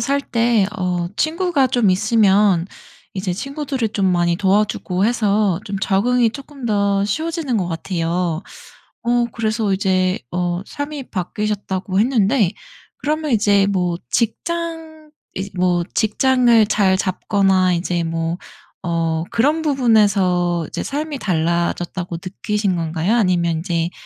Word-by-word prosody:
살 280 Hz, 0 st, +1 dB
때 230 Hz, -5 st, +1 dB
어 180 Hz, -1 st, -1 dB
친구가 325 Hz, -4 st, +1 dB
좀 235 Hz, -6 st, +2 dB
있으면 200 Hz, -3 st, +3 dB, 0.5 s
이제 185 Hz, -1 st, -3 dB
친구들이 270 Hz, -, -3 dB
좀 195 Hz, -3 st, 0 dB
많이 175 Hz, -1 st, +2 dB
도와주고 195 Hz, -1 st, +1 dB
해서 210 Hz, -5 st, +1 dB
좀 200 Hz, -2 st, -4 dB
적응이 230 Hz, +5 st, +2 dB
쪼끔 275 Hz, 0 st, -10 dB
더 200 Hz, -2 st, +1 dB
쉬워지는 315 Hz, -, -2 dB
것 180 Hz, -2 st, -2 dB
같아요. 170 Hz, 0 st, -2 dB, 0.6 s
어 240 Hz, 0 st, +2 dB
그래서 215 Hz, -2 st, -1 dB
이제 185 Hz, -1 st, +1 dB
어 175 Hz, +1 st, -1 dB
삶이 285 Hz, -2 st, -6 dB
바뀌셨다고 195 Hz, -1 st, -2 dB
했는데 220 Hz, -4 st, +2 dB, 0.5 s
그러면 305 Hz, 0 st, -2 dB
이제 205 Hz, -2 st, +3 dB
뭐 180 Hz, -3 st, 0 dB
직장 320 Hz, +4 st, -3 dB, 0.2 s
이제 195 Hz, +1 st, -4 dB
뭐 180 Hz, -1 st, +1 dB
직장을 235 Hz, 0 st, +3 dB
잘 195 Hz, -3 st, +2 dB
잡거나 190 Hz, -1 st, +1 dB
이제 170 Hz, 0 st, -1 dB
뭐 165 Hz, +1 st, -2 dB, 0.5 s
어 165 Hz, -1 st, 0 dB
그런 295 Hz, +7 st, +2 dB
부분에서 200 Hz, -, +2 dB
이제 -, -, -4 dB
'삶이 295 Hz, 0 st, -3 dB
달라졌다.'고 170 Hz, -1 st, -1 dB
느끼신 200 Hz, 0 st, -1 dB
건가요? 165 Hz, +6 st, 0 dB
아니면 175 Hz, -6 st, +2 dB
인제 170 Hz, 0 st, -1 dB
200 Hz, 260 characters per minute, -19 LUFS, 180-240 Hz, 0.6 s, 있으면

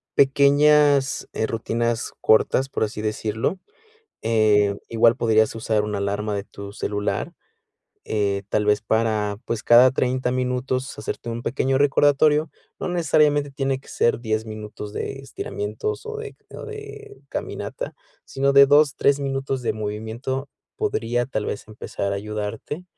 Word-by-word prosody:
pequeñas, 140 Hz, 0 st, +4 dB
eh, 110 Hz, -, -1 dB
rutinas 115 Hz, +1 st, -2 dB
cortas, 130 Hz, +4 st, +3 dB
por -, -, -1 dB
así 105 Hz, 0 st, -3 dB
decirlo, 110 Hz, -, -2 dB, 0.6 s
eh, 105 Hz, -3 st, +3 dB
igual 115 Hz, 0 st, +4 dB
podrías 110 Hz, -2 st, +3 dB
usar 110 Hz, -1 st, 0 dB
una 105 Hz, -1 st, -3 dB
alarma 100 Hz, +1 st, -2 dB
de 100 Hz, -, -3 dB
tu 100 Hz, -1 st, -9 dB
celular, 105 Hz, 0 st, -2 dB, 0.8 s
eh, 100 Hz, -2 st, 0 dB
tal 105 Hz, -, +1 dB
vez 105 Hz, 0 st, +3 dB
para, 110 Hz, -2 st, 0 dB
pues, 115 Hz, -2 st, -2 dB
cada 125 Hz, +2 st, +7 dB
30 130 Hz, -1 st, 0 dB
minutos, 130 Hz, +1 st, -2 dB
hacerte 110 Hz, -, -5 dB
un 115 Hz, +1 st, -5 dB
pequeño 135 Hz, +1 st, 0 dB
recordatorio, 145 Hz, +2 st, +3 dB, 0.3 s
no -, -, -2 dB
necesariamente 150 Hz, -4 st, +2 dB
tiene 135 Hz, -1 st, -2 dB
que -, -, -20 dB
ser 120 Hz, -, +1 dB
10 110 Hz, -2 st, -1 dB
minutos 105 Hz, -1 st, -7 dB
de 135 Hz, -, -4 dB
estiramientos, 135 Hz, -, -5 dB
o 445 Hz, 0 st, -5 dB
de 445 Hz, -1 st, -8 dB
o -, -, -8 dB
de 430 Hz, -1 st, -10 dB
caminata, -, -, -5 dB, 0.3 s
sino 140 Hz, +1 st, 0 dB
de 140 Hz, 0 st, +8 dB
2, 145 Hz, 0 st, +5 dB
3 140 Hz, 0 st, +3 dB
minutos 135 Hz, -1 st, -2 dB
de -, -, 0 dB
movimiento 110 Hz, +6 st, -4 dB, 0.3 s
podría, 120 Hz, -, -1 dB
tal 110 Hz, -5 st, -3 dB
vez, 100 Hz, -, -5 dB
empezar 100 Hz, -2 st, -4 dB
a -, -, -1 dB
ayudarte 105 Hz, -, -5 dB
120 Hz, 145 wpm, -23 LUFS, 110-140 Hz, 0.8 s, de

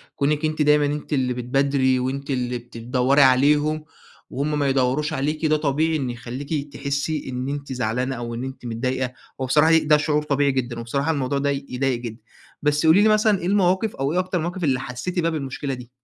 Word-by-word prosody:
كونِك 150 Hz, +2 st, 0 dB
أنتِ 155 Hz, 0 st, -1 dB
دايمًا 150 Hz, 0 st, +4 dB
أنتِ 150 Hz, +1 st, -3 dB
اللي 130 Hz, -3 st, +1 dB
بتبادري 130 Hz, +1 st, +1 dB
وأنتِ 135 Hz, +3 st, -3 dB
اللي 125 Hz, -2 st, -1 dB
بت 120 Hz, 0 st, -13 dB
دوَّري 125 Hz, +4 st, +2 dB
عليهم 145 Hz, +4 st, +3 dB, 0.4 s
وهُم 150 Hz, +2 st, -2 dB
ما 140 Hz, -, +1 dB
يدوروش 135 Hz, +4 st, +1 dB
عليكِ 155 Hz, +2 st, -1 dB
ده 155 Hz, 0 st, +3 dB
طبيعي 155 Hz, +2 st, +1 dB
إنه 130 Hz, -4 st, -3 dB
يخليكِ 140 Hz, +5 st, -5 dB
تحسي 140 Hz, +1 st, -2 dB
إن 130 Hz, +1 st, -3 dB
أنتِ 140 Hz, -2 st, -4 dB
زعلانة، 125 Hz, +2 st, -1 dB
أو 120 Hz, -1 st, -5 dB
إن 120 Hz, -, -4 dB
أنتِ 130 Hz, -1 st, -7 dB
متضايقة 125 Hz, +2 st, -2 dB, 0.3 s
وبصراحة 150 Hz, +5 st, +3 dB
ي 160 Hz, -, +6 dB
ده 150 Hz, -1 st, +4 dB
شعور 150 Hz, 0 st, 0 dB
طبيعي 140 Hz, -1 st, +1 dB
جدًا، 120 Hz, -2 st, -3 dB
وبصراحة 140 Hz, +6 st, -1 dB
الموضوع 140 Hz, -2 st, -1 dB
ده 140 Hz, +1 st, 0 dB
يضايق 135 Hz, -2 st, -1 dB
جدًا، 115 Hz, -2 st, -7 dB, 0.4 s
بس 150 Hz, +2 st, +1 dB
قولي 165 Hz, +6 st, +6 dB
لي 215 Hz, -, +5 dB
مثلًا 215 Hz, -2 st, +3 dB
إيه 175 Hz, -, -5 dB
المواقف 190 Hz, +2 st, +2 dB
أو 135 Hz, +3 st, -1 dB
إيه 180 Hz, -, +2 dB
أكتر 185 Hz, 0 st, -1 dB
المواقف 175 Hz, +2 st, -3 dB
اللي 130 Hz, -4 st, +2 dB
حسيتِ 135 Hz, +8 st, -4 dB
بيها 165 Hz, -1 st, +1 dB
بالمشكلة 140 Hz, -2 st, -4 dB
دي؟ 125 Hz, -2 st, -9 dB
140 Hz, 200 wpm, -23 LUFS, 130-150 Hz, 0.4 s, ي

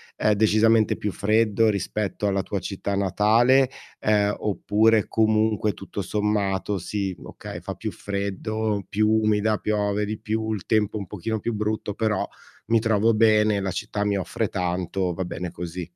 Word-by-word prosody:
eh, 105 Hz, -, +2 dB
decisamente 110 Hz, +1 st, +3 dB
più 105 Hz, -, -3 dB
freddo 110 Hz, +2 st, +2 dB
rispetto 105 Hz, 0 st, -2 dB
alla 100 Hz, -1 st, +1 dB
tua 100 Hz, -, -3 dB
città 100 Hz, +1 st, -3 dB
natale, 110 Hz, +7 st, +3 dB, 0.3 s
ehm, 105 Hz, -1 st, +2 dB
oppure 105 Hz, +2 st, +2 dB
comunque 110 Hz, -1 st, +2 dB
tutto 95 Hz, +3 st, -6 dB
sommato 105 Hz, 0 st, 0 dB
sì, 95 Hz, +1 st, -3 dB
okay, -, -, -8 dB
fa -, -, -5 dB
più -, -, -5 dB
freddo, 100 Hz, +1 st, -3 dB
più 105 Hz, +1 st, +1 dB
umida, 110 Hz, 0 st, +2 dB
piove 105 Hz, -1 st, 0 dB
di 105 Hz, +1 st, -4 dB
più, 110 Hz, 0 st, -2 dB
il 100 Hz, -, -5 dB
tempo 110 Hz, -1 st, +1 dB
un 100 Hz, -, -5 dB
pochino 110 Hz, +4 st, -3 dB
più 120 Hz, -, -2 dB
brutto, 105 Hz, -1 st, -2 dB
però 110 Hz, -3 st, 0 dB, 0.4 s
mi 115 Hz, +1 st, +4 dB
trovo 110 Hz, 0 st, +2 dB
bene, 105 Hz, -1 st, +4 dB
la 95 Hz, -1 st, -2 dB
città 100 Hz, +4 st, -3 dB
mi 100 Hz, -1 st, +1 dB
offre 95 Hz, -, -2 dB
tanto, 90 Hz, +1 st, -2 dB
va 95 Hz, -, -3 dB
bene 90 Hz, 0 st, -5 dB
così. 90 Hz, 0 st, -6 dB
105 Hz, 160 wpm, -24 LUFS, 100-110 Hz, 0.4 s, mi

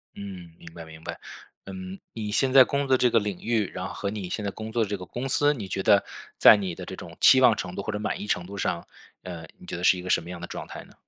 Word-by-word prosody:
嗯， 95 Hz, -4 st, -8 dB
明 85 Hz, -1 st, -13 dB
白 85 Hz, -1 st, -9 dB
明 80 Hz, 0 st, -13 dB
白。 -, -, -6 dB, 0.5 s
嗯， 95 Hz, 0 st, -8 dB
你 105 Hz, -2 st, -4 dB
现 130 Hz, +4 st, +2 dB
在 130 Hz, 0 st, +9 dB
工 140 Hz, +2 st, -1 dB
作 130 Hz, -1 st, +4 dB
这 125 Hz, -, +3 dB
个 115 Hz, -, +4 dB
领 100 Hz, -3 st, -4 dB
域， 110 Hz, -4 st, 0 dB
然 90 Hz, +1 st, -4 dB
后 -, -, -8 dB
和 100 Hz, -, -3 dB
你 100 Hz, -3 st, -5 dB
现 105 Hz, -, -3 dB
在 100 Hz, -, -2 dB
工 110 Hz, +3 st, -7 dB
作 115 Hz, 0 st, +1 dB
的 105 Hz, -, -4 dB
这 100 Hz, -, -2 dB
个 90 Hz, -, -9 dB
公 125 Hz, +9 st, -5 dB
司， 145 Hz, +2 st, +3 dB
你 110 Hz, -9 st, -6 dB
觉 95 Hz, +1 st, -3 dB
得 100 Hz, -2 st, +5 dB, 0.3 s
在 -, -, +8 dB
你 95 Hz, -4 st, -3 dB
的 -, -, -8 dB
这 -, -, -7 dB
种 -, -, -10 dB
期 130 Hz, -, +8 dB
望 125 Hz, -4 st, +6 dB
程 90 Hz, -3 st, -5 dB
度 100 Hz, -, -4 dB
或 110 Hz, -, -3 dB
者 105 Hz, -, -3 dB
满 105 Hz, -, -2 dB
意 -, -, -5 dB
程 90 Hz, -4 st, -1 dB
度 100 Hz, +2 st, -9 dB
上， 85 Hz, -3 st, -2 dB, 0.4 s
呃， 85 Hz, -3 st, -7 dB
你 -, -, -15 dB
觉 -, -, -4 dB
得 90 Hz, -, -6 dB
是 90 Hz, -, +5 dB
一 -, -, -6 dB
个 90 Hz, -, -7 dB
什 -, -, +3 dB
么 85 Hz, -, -11 dB
样 90 Hz, -1 st, -7 dB
的 85 Hz, -, -6 dB
状 -, -, -7 dB
态 -, -, -9 dB
呢？ -, -, -19 dB
100 Hz, 330 characters per minute, -26 LUFS, 90-110 Hz, 0.5 s, 在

